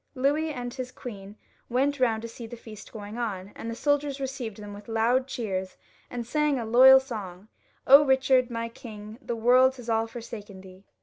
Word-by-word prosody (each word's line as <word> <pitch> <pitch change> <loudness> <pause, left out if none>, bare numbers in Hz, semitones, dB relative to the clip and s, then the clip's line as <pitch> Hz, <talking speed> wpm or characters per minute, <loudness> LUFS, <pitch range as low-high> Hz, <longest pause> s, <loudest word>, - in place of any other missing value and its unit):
Louis 290 +5 +1
and 245 -3 -5
his 255 -1 -6
queen 205 -6 -9 0.3
went 275 +3 +1
round 225 -3 +1
to - - -4
see 230 0 -9
the 240 - -9
feast 220 -2 -12
as - - -22
it - - -4
went 210 +3 -7
on, 200 -4 -4
and 230 - -7
the 230 - -4
soldiers 290 +1 0
received 260 -6 -5
them 205 -1 -9
with 205 0 -11
loud 235 +3 +1
cheers, 190 -7 -4 0.3
and 240 -1 -5
sang 300 +2 +1
a 235 - -3
loyal 260 +4 +8
song, 210 -6 -8 0.2
" - - -33
Eichard, 265 -2 +6
my 230 -1 -3
king, 220 -2 -10
the 240 - -4
world 255 +3 +4
has 240 -3 -5
all 225 0 +1
forsaken 225 -4 -9
thee." 190 +1 -15
235 Hz, 200 wpm, -27 LUFS, 215-260 Hz, 0.3 s, loyal